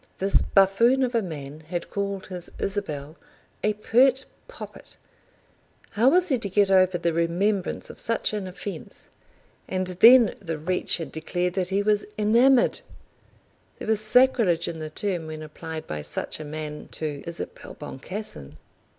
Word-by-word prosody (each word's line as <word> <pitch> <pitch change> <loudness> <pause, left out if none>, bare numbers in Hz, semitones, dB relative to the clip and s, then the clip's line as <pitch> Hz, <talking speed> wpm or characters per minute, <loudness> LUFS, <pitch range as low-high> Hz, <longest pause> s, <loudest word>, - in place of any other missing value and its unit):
This 195 +1 +4
buffoon 230 +7 +4
of 250 -1 -1
a 230 - +2
man 150 -5 -7
had 170 +2 -6
called 200 -1 -3
his 180 -2 -7
Isabel 160 -7 -4 0.5
a 210 - +2
pert 255 +5 +3 0.2
poppet! - - -11 0.9
How 230 +5 +4
was 360 +3 +4
he 260 -4 +2
to 200 - -4
get 195 0 +3
over 185 -1 +4
the 170 -1 0
remembrance 180 +4 -1
of - - -13
such 230 -1 -1
an 205 -3 -3
offence? 190 +2 -8 0.6
And 185 0 -1
then 225 +6 +6
the 165 -5 -4
wretch 180 +4 0
had 160 -6 -6
declared 175 +3 -2
that 185 -1 -1
he 195 +1 +1
was 210 0 +1
enamoured! 240 +5 +4 1.0
There - - -8
was 220 -1 +2
sacrilege 215 -7 +3
in 165 -1 -5
the 155 0 -5
term 175 0 -3
when 155 0 -7
applied 155 +1 -7
by 75 -1 -5
such - - -4
a - - -5
man 150 0 -6
to 150 -3 -4
Isabel 170 - -7
Boncassen. 135 - -8
190 Hz, 155 wpm, -25 LUFS, 160-215 Hz, 1.0 s, then